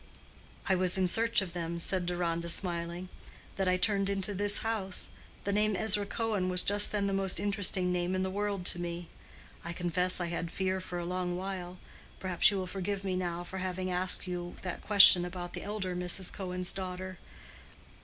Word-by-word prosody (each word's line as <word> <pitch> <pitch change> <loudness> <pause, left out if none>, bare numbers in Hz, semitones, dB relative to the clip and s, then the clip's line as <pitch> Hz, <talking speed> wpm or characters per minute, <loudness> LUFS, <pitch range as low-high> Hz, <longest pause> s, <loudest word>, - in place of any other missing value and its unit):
"It 190 -2 +2
was 185 0 +2
in 185 -1 +2
search 230 +4 +3
of 175 -3 -8
them," 170 -1 -4
said 180 +1 +1
Deronda, 170 -1 -2
smiling, 170 0 -2 0.5
"that 190 -1 0
I 185 0 +3
turned 200 0 +1
into 200 0 -1
this 205 +1 +3
house: 200 -5 0 0.3
the 200 - -1
name 210 0 +2
Ezra 205 +1 +2
Cohen 210 -4 -1
was 180 0 +3
just 205 +1 +6
then 205 -1 0
the 200 - -1
most 195 -1 +1
interesting 195 -3 +2
name 180 +1 -1
in 185 - 0
the 190 - -2
world 200 -2 -2
to 175 - +2
me. 170 0 -5 0.5
I 170 - -5
confess 180 +1 0
I 175 - -1
had 170 0 -3
fear 190 +1 -2
for 180 -1 -6
a 175 - -4
long 180 0 -2
while. 185 -1 -5 0.4
Perhaps 185 -2 +3
you 200 - -2
will 185 - -2
forgive 195 +1 -4
me 190 -2 -2
now 175 -1 -3
for 190 +2 -7
having 185 0 -3
asked 180 +1 +1
you 175 -1 -5
that 180 -2 -5
question 200 -3 +8
about 175 0 -6
the - - -5
elder 200 -3 -4
Mrs. 180 +1 -1
Cohen's 180 -2 -2
daughter. 185 -1 -6
185 Hz, 195 wpm, -30 LUFS, 180-195 Hz, 0.5 s, question